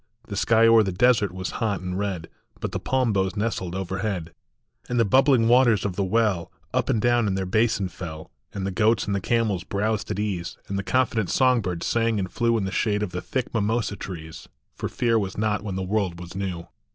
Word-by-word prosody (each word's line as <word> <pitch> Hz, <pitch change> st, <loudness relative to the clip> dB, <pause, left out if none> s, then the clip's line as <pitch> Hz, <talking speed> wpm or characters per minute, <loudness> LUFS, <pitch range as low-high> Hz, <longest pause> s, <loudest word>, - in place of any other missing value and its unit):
The 100 Hz, -, -4 dB
sky 115 Hz, +3 st, +4 dB
o 115 Hz, 0 st, +6 dB
er -, -, +7 dB
the 95 Hz, -3 st, 0 dB
desert 110 Hz, -1 st, +3 dB
was 95 Hz, 0 st, -5 dB
hot 105 Hz, -5 st, 0 dB
and 90 Hz, 0 st, -4 dB
red, 95 Hz, -4 st, -3 dB, 0.3 s
But -, -, -3 dB
the -, -, -3 dB
palm 130 Hz, -4 st, +1 dB
boughs 95 Hz, 0 st, 0 dB
nestled 100 Hz, -5 st, -2 dB
overhead, 95 Hz, -2 st, -3 dB, 0.6 s
And 120 Hz, -1 st, 0 dB
the 115 Hz, -, +4 dB
bubbling 130 Hz, +1 st, +4 dB
waters 120 Hz, -4 st, +4 dB
of 95 Hz, -3 st, -2 dB
the 100 Hz, -, 0 dB
well 95 Hz, -3 st, +1 dB, 0.2 s
Up 130 Hz, 0 st, 0 dB
and 120 Hz, -5 st, +2 dB
down 120 Hz, 0 st, +2 dB
in 95 Hz, -, 0 dB
their 95 Hz, 0 st, -1 dB
basin 110 Hz, 0 st, +1 dB
fell, 85 Hz, -3 st, -8 dB, 0.2 s
And 95 Hz, -, -4 dB
the 100 Hz, -, -1 dB
goats 110 Hz, +3 st, +2 dB
and 100 Hz, -, -1 dB
the 100 Hz, -, -1 dB
camels 110 Hz, -5 st, 0 dB
browsed 105 Hz, 0 st, -1 dB
at -, -, -2 dB
ease, 100 Hz, -5 st, -3 dB
And 100 Hz, -, -4 dB
the -, -, -3 dB
confident 115 Hz, -3 st, +1 dB
song 130 Hz, -2 st, +3 dB
birds 90 Hz, -4 st, -3 dB
sang 115 Hz, -1 st, +1 dB
and 95 Hz, -2 st, -2 dB
flew 115 Hz, -1 st, +1 dB
In 100 Hz, -, -1 dB
the 95 Hz, -, -3 dB
shade 105 Hz, +1 st, 0 dB
of 100 Hz, -, -3 dB
the 90 Hz, -, -4 dB
thick 130 Hz, +5 st, -3 dB
mimosa 110 Hz, -1 st, 0 dB
trees; 80 Hz, -5 st, -8 dB, 0.2 s
For -, -, -4 dB
fear 115 Hz, -2 st, +1 dB
was 95 Hz, -3 st, -4 dB
not 105 Hz, 0 st, 0 dB
when 100 Hz, -3 st, -4 dB
the 95 Hz, -, -2 dB
world 95 Hz, -3 st, -1 dB
was 90 Hz, 0 st, -9 dB
new. 95 Hz, -3 st, -4 dB
100 Hz, 225 wpm, -25 LUFS, 95-115 Hz, 0.6 s, er